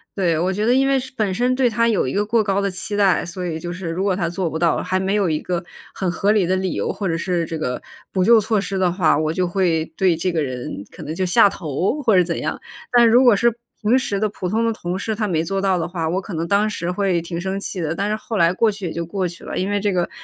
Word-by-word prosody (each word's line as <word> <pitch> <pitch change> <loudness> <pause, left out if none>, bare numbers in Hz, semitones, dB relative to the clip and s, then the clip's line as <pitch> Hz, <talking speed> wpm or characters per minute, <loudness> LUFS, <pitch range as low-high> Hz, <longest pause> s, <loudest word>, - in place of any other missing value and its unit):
对， 175 -5 +1
我 180 +3 0
觉 205 +3 -2
得 240 +3 +3
因 270 +1 +3
为 270 -1 +3
是 265 +1 -8
本 205 -4 0
身 245 +5 +1
对 260 -1 +3
他 230 0 +1
有 215 - +1
一 130 - -3
个 205 - +1
过 220 +1 +2
高 200 0 0
的 200 - 0
期 190 +3 -4
待， 200 -3 +3
所 180 +1 -5
以 160 -2 -3
就 175 +1 -5
是 180 -1 -5
如 175 +3 -2
果 195 -2 +1
他 170 -3 -1
做 175 +1 -2
不 160 0 -3
到， 170 -1 +2
还 185 0 0
没 190 +2 0
有 205 -3 +2
一 155 -2 0
个 175 -1 -3 0.3
很 190 - -2
合 200 +4 +1
理 210 -4 +3
的 185 +2 +1
理 185 -1 -1
由 - - -2
或 200 - -3
者 165 - 0
是 175 -1 -1
这 165 - -4
个 125 -5 -3 0.3
补 185 - +1
救 230 +3 +6
措 215 -1 0
施 195 0 -3
的 185 -2 +2
话， 170 -5 +2
我 155 +1 0
就 180 +1 0
会 175 -3 +1
对 185 -3 +3
这 180 +3 -1
个 160 -3 0
人 125 -6 -5
可 - - -12
能 155 - -5
就 185 - 0
下 180 +3 +5
头 180 - -2
或 220 -5 +4
者 180 - +6
怎 170 -1 -3
样。 - - -3 0.3
但 240 -2 +6
如 245 +3 +6
果 240 -4 +6
是 235 +3 +2 0.3
平 235 +5 +3
时 205 -6 -2
的 215 +2 0
普 190 -3 -5
通 220 +5 0
的 230 - +2
同 180 -4 -4
事， 220 +3 -2
他 215 0 -1
没 165 -4 0
做 195 +3 -2
到 195 -1 +1
的 165 - -1
话， 165 -2 -2
我 180 +4 -1
可 195 - -8
能 165 +1 -2
当 200 +3 +2
时 180 -4 -3
会 185 -2 0
挺 170 0 -5
生 190 +1 -2
气 190 -2 -4
的， 160 0 -1
但 200 +4 -2
是 215 - 0
后 220 0 -5
来 170 0 +4
过 220 +3 +2
去 200 -2 -7
也 - - -5
就 170 0 -3
过 185 +2 -2
去 170 0 -10
了， - - -5
因 190 - -1
为 205 - +1
这 205 - +1
个 180 -2 0
190 Hz, 325 characters per minute, -21 LUFS, 170-210 Hz, 0.3 s, 救